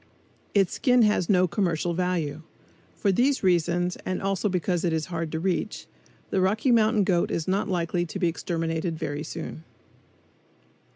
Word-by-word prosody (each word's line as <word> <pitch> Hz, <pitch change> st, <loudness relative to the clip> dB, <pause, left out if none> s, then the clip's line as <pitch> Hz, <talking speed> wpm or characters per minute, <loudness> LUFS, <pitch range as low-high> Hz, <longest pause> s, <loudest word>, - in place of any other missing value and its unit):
Its 195 Hz, -3 st, +3 dB
skin 250 Hz, -3 st, +3 dB
has 210 Hz, -5 st, +2 dB
no 185 Hz, -2 st, +4 dB
commercial 175 Hz, -2 st, 0 dB
value. 170 Hz, -4 st, -1 dB, 0.5 s
For 200 Hz, -, +1 dB
these 260 Hz, +7 st, +2 dB
reasons 175 Hz, 0 st, +1 dB
and 185 Hz, -, -3 dB
also 195 Hz, +1 st, 0 dB
because 180 Hz, -1 st, -1 dB
it 170 Hz, -2 st, +1 dB
is 160 Hz, -1 st, -1 dB
hard 165 Hz, -2 st, -3 dB
to 160 Hz, -, -2 dB
reach, 190 Hz, +4 st, -2 dB, 0.5 s
the 190 Hz, -, +2 dB
Rocky 215 Hz, +7 st, +2 dB
Mountain 220 Hz, -2 st, +4 dB
goat 180 Hz, -3 st, +1 dB
is 160 Hz, -, -2 dB
not 200 Hz, +3 st, 0 dB
likely 175 Hz, -1 st, 0 dB
to 180 Hz, -, -6 dB
be 180 Hz, -2 st, +1 dB
exterminated 165 Hz, -1 st, -2 dB
very 150 Hz, -2 st, -3 dB
soon. 160 Hz, 0 st, -7 dB
180 Hz, 160 wpm, -26 LUFS, 165-195 Hz, 0.5 s, no